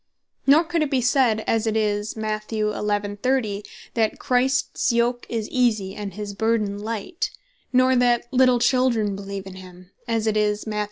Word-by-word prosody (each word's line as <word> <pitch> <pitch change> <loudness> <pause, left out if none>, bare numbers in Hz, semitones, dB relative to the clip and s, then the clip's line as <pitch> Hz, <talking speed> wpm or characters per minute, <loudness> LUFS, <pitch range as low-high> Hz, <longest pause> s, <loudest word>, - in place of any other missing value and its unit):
Nor 295 +4 +6
could 335 0 -1
it 305 - +1
bee 270 -2 +1
said 245 -3 +2
(as 225 0 +1
it 220 0 +1
is 210 0 -1
Mat. 215 0 -3
11. 210 -1 -1
30.) 220 -4 0 0.3
that 220 -2 0
"Christs 255 +1 +1
yoke 240 +1 0
is 225 -2 -2
Easy, 220 -7 +1
and 200 -3 -6
his 210 -1 -5
burthen 215 -1 0
Light:" 225 - -3 0.4
Nor 255 0 +4
that 245 -1 +3
"Little 255 -1 +5
Children 240 -4 +2
beleeve 195 0 -6
in 190 -1 -9
him," 185 0 -13 0.2
as 225 -2 0
it 220 -1 +1
is 210 0 0
Matth. 210 -1 -3
220 Hz, 170 wpm, -23 LUFS, 205-250 Hz, 0.4 s, Nor